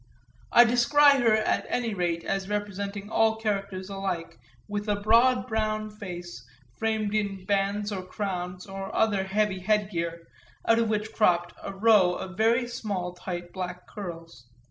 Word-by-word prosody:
I 240 - +9
descry 275 +4 +5
her 225 -2 +4
at 215 0 0
any 235 -3 -1
rate 175 -3 -1
as 195 0 -2
representing 205 0 -4
all 225 0 +3
characters 200 -4 -3
alike 190 - -4 0.3
with 205 +1 -3
a 205 - +3
broad 230 +5 +4
brown 215 -2 -1
face 175 - -8 0.4
framed 220 -2 0
in 200 -3 -2
bands 200 +1 0
or 195 -2 -3
crowns 185 -2 -4
or 195 0 -6
other 205 -4 +2
heavy 195 0 0
headgear 180 -5 -1 0.4
out 230 0 +5
of 230 -1 +1
which 215 0 -2
cropped 175 -5 +2
a - - -5
row 195 -3 +4
of 185 0 -6
very 230 +4 +2
small 195 -7 -4
tight 175 -1 -6
black 180 -1 -5
curls. 165 - -9
200 Hz, 150 wpm, -27 LUFS, 185-215 Hz, 0.4 s, I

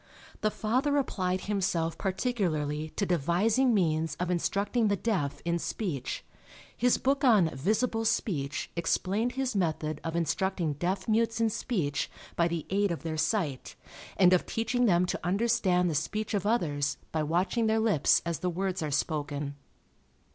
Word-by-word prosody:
The 215 - +2
father 255 +8 0
applied 185 -9 -1
himself 180 -5 -1
particularly 170 - -1
to 200 - 0
devising 185 - +2
means 160 -6 +1
of 180 +2 -2
instructing 200 +6 +1
the 200 - +2
deaf 190 -9 -2
in 170 0 0
speech. 160 - -3 0.5
His 245 +1 +3
book 275 +1 0
on 210 -10 +5
Visible 220 - 0
Speech 150 -11 -1
explained 195 +7 0
his 265 -3 -2
method 155 -4 -1
of 165 0 -3
instructing 170 0 0
deaf 185 +6 -2
mutes 225 +1 +1
in 225 -1 +2
speech 170 - -1 0.3
by 170 - +3
the 170 -2 -3
aid 200 0 +2
of 170 - -4
their 160 -1 -3
sight, 155 - -1 0.4
and 185 -1 +6
of 180 - +2
teaching 235 +2 0
them 180 -2 +4
to - - -3
understand 195 -2 +2
the 165 - 0
speech 210 +9 -2
of 205 -1 0
others 150 -11 0
by 160 - 0
watching 180 +9 +1
their 220 0 +2
lips 215 -10 +3
as 170 -2 -2
the 180 - -1
words 185 +1 -2
are 155 - -2
spoken. 145 -1 -2
185 Hz, 155 wpm, -29 LUFS, 160-220 Hz, 0.5 s, and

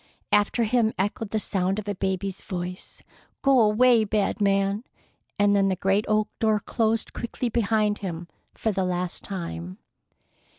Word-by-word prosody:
After 210 +3 +3
him 225 0 +2
echoed 205 +2 -2
the 220 - 0
sound 190 -1 0
of 210 -1 -5
a 205 - -1
baby's 190 0 -2
voice, 180 0 -6 0.4
"Go 275 -2 +5
away, 225 +2 +5
bad 210 0 0
man!" 200 +1 +2 0.5
and 205 0 +4
then 195 -1 +3
the 190 - +1
great 195 +3 +1
oak 215 0 +2
door 220 -1 +2
closed 225 +1 -1
quickly 240 +1 -3
behind 215 -2 +1
him 175 -3 -5 0.3
for 220 - -1
the 195 -2 -1
last 180 -1 -2
time. 90 - -6
205 Hz, 155 wpm, -25 LUFS, 190-220 Hz, 0.5 s, Go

